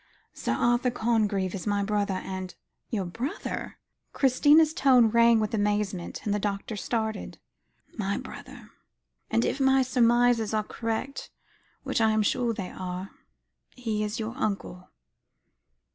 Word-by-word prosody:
Sir 115 - -2
Arthur 240 - +2
Congreve 215 -6 0
is 195 +1 -5
my 205 -1 +1
brother, 205 -1 0
and 185 -1 -6 0.2
" - - -53
"Your 205 -5 -2
brother?" 235 - -5 0.4
Christina's 295 +4 +4
tone 250 -6 +5
rang 235 0 +5
with 215 0 -2
amazement, 205 -4 -1
and 205 - +1
the 210 - 0
doctor 205 +1 -3
started. 220 0 -3 0.6
"My 200 -1 -1
brother; 260 -4 -10 0.6
and 230 - +2
if - - -1
my 265 0 +4
surmises 240 -3 +3
are 215 - +1
correct, 230 +5 -4 0.5
which - - -1
I 220 -1 +4
am 215 0 +2
sure 240 +3 +1
they 200 -5 -5
are, 185 +1 -6 0.6
he 220 -4 -2
is 210 +3 -3
your 225 +2 -4
uncle." 195 -6 -3
220 Hz, 140 wpm, -27 LUFS, 205-245 Hz, 0.6 s, tone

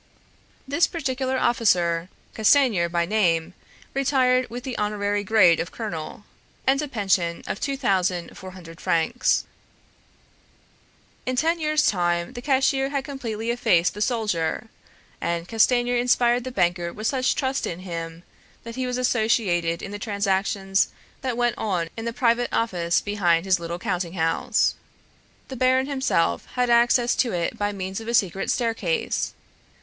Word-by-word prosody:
This 285 +5 +2
particular 265 -4 -2
officer, 180 -9 +2 0.2
Castanier 220 -6 +3
by 170 0 0
name, 175 -4 +1 0.4
retired 255 -2 +2
with 245 +2 -7
the 260 -2 -5
honorary 205 -1 -1
grade 195 -6 +5
of 170 - -3
colonel, 205 -4 -6 0.4
and 275 +2 +3
a 300 - -3
pension 190 -8 0
of - - -4
two 275 -1 -2
thousand 185 -8 0
four 185 - -9
hundred 170 -3 -12
francs. 170 +10 +1 1.8
In 255 - 0
ten 325 +6 +1
years' 305 -1 +1
time 175 +2 0
the 245 - -7
cashier 270 0 +2
had 280 -1 -2
completely 235 -5 -4
effaced 215 -8 +2
the 210 - -7
soldier, 215 -3 -1 0.5
and 170 0 -2
Castanier 245 +2 +2
inspired 240 0 +2
the 255 - -4
banker 175 -4 0
with 215 +4 -7
such 255 +1 +1
trust 265 0 -1
in 175 +1 -5
him, 165 -2 -6 0.4
that 230 0 -8
he 255 0 -2
was 250 0 -2
associated 215 -9 +1
in 195 - -6
the 205 - -6
transactions 195 -1 0 0.3
that 255 -3 -2
went 240 -1 0
on 180 -6 -1
in 225 - -6
the 235 - -1
private 235 -1 +1
office 175 -7 0
behind 180 -4 +1
his 190 -2 +2
little 170 0 -4
counting 180 -3 -3
house. 165 -3 +1 0.8
The 265 - -6
baron 255 +1 +3
himself 265 - 0
had 250 -1 +1
access 240 +1 +4
to 240 -5 +1
it 170 -1 -1
by 205 0 -1
means 190 +1 -5
of 225 - -10
a 235 - 0
secret 195 -3 +1
staircase. 245 - -1
220 Hz, 150 wpm, -24 LUFS, 175-250 Hz, 1.8 s, grade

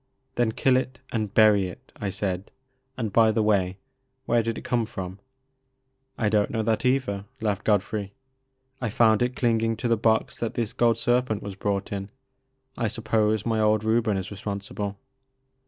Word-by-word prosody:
Then 120 -3 +1
kill 130 +2 +3
it 130 0 -3
and 110 -3 -1
bury 105 -3 +5
it," 90 - -12
I 100 - -3
said; 95 -1 -3 0.2
*' 130 0 -46
and 110 -5 -3
by 115 -1 +6
the 110 0 +1
way, 95 -3 +1 0.5
where 120 0 +3
did 115 0 -2
it - - -7
come 120 -2 +1
fix)m? 95 -4 -6 0.5
" 130 0 -48
I 110 - +1
don't 105 -1 +2
know 110 -1 -1
that 110 +3 0
either," 125 -7 +1
laughed 105 -2 -1
Godfiey; 105 -1 +1 0.7
I 125 - -1
found 110 -1 +4
it 125 +1 0
clinging 115 -2 +1
to 120 - -2
the 115 -1 +3
box 110 +1 +1
that 115 - -3
this 115 -3 -2
gold 115 -2 +3
ser 120 0 +3
pent 110 -5 -4
was 100 -1 -5
brought 100 0 -2
in, 100 0 -4 0.7
I 120 - 0
suppose 110 -1 0
my 115 -1 +1
old 110 0 +3
Reuben 110 -2 +2
is 95 +1 -5
responsible." 100 0 -5
110 Hz, 185 wpm, -26 LUFS, 100-120 Hz, 0.7 s, by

